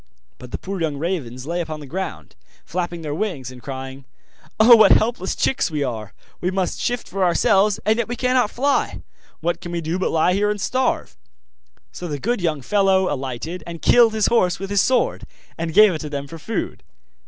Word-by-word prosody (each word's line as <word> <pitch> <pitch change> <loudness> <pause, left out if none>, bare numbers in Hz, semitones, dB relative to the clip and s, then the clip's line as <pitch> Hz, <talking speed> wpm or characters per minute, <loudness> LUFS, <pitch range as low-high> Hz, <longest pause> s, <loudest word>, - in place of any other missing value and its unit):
But 125 - -10
the - - -4
poor 190 -1 -6
young 155 -3 -1
ravens 140 -7 -3
lay 170 +3 -2
upon 155 -2 -5
the 150 - -9
ground, 190 +7 -6 0.3
flapping 175 -2 -4
their 150 -2 -3
wings, 150 - -3
and 125 -1 -12
crying: 135 0 -7 0.5
'Oh, 235 +2 +9
what 220 - +7
helpless 220 -4 0
chicks 265 - +1
we 150 -3 -1
are! 110 -6 -5 0.3
We 180 - 0
must 190 -1 -2
shift 245 -1 -2
for 195 -1 -2
ourselves, 195 +3 +3
and 220 +2 +2
yet 235 - 0
we 240 - -3
cannot 250 -3 +2
fly! 275 +5 0 0.4
What 170 +2 -1
can 175 - -7
we 170 - -2
do, 165 +3 -2
but 185 - 0
lie 165 +3 +2
here 205 +2 +1
and 210 0 -2
starve?' 255 +5 -1 0.8
So 180 - -7
the 145 -3 -3
good 230 - -1
young 155 -5 -1
fellow 190 +2 +2
alighted 135 +6 -5
and 170 -1 -7
killed 235 -2 +5
his 215 - +2
horse 185 -7 +2
with 195 +1 -6
his 200 - +4
sword, 255 -2 +1 0.3
and 165 0 -3
gave 210 +2 +6
it 155 - -4
to 150 - -5
them 140 -1 -4
for 165 +2 -9
food. 220 +6 -4
180 Hz, 205 wpm, -21 LUFS, 150-210 Hz, 0.8 s, Oh